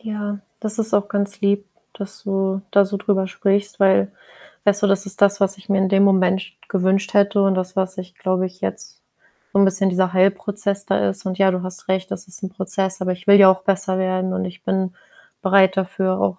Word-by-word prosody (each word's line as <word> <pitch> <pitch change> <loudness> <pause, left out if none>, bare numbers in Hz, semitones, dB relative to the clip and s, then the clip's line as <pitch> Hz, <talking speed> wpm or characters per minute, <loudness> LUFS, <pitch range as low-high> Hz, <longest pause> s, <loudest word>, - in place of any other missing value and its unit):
Ja, 210 -3 -5 0.2
das 215 0 -2
ist 220 -2 0
auch 205 0 +1
ganz 200 0 -3
lieb, 200 0 +1 0.3
dass 200 +1 -7
du 195 -1 -1
da 200 0 +5
so 200 +1 -4
drüber 195 -2 0
sprichst, 200 +2 -1
weil 145 - +3 0.5
weißt 205 0 +2
du, - - +4
das 195 0 +1
ist 195 0 -3
das, 200 0 +4
was 195 0 +1
ich 195 - -18
mir 200 -1 +2
in 190 0 +2
dem 195 0 +4
Moment 190 -1 +2 0.2
gewünscht 195 +1 0
hätte 200 0 +3
und 195 -1 +3
das 185 0 -3
was 190 0 -2
ich, 185 0 -8
glaube 185 0 -1
ich, 185 0 -12
jetzt - - -6 0.5
so 195 - +1
'n 200 - +6
bisschen 195 0 +2
dieser 185 0 0
Heilprozess 200 +1 0
da 100 - +1
ist 95 - -6
und, 185 - -2
ja, 195 -1 +4
du 185 -1 -2
hast 185 0 -8
recht, 190 0 -1
das 185 +3 -6
ist 185 +2 -10
'n 190 - -3
Prozess, 190 0 -3
aber 185 0 0
ich 180 +2 -10
will 200 - +8
ja 195 -2 +9
auch 190 0 0
besser 190 0 0
werden 185 0 -1
und - - -2
ich 180 0 -9
bin 190 -1 -1 0.5
bereit 190 0 +4
dafür, 190 0 -1
auch, 185 - 0
195 Hz, 225 wpm, -20 LUFS, 185-200 Hz, 0.5 s, ja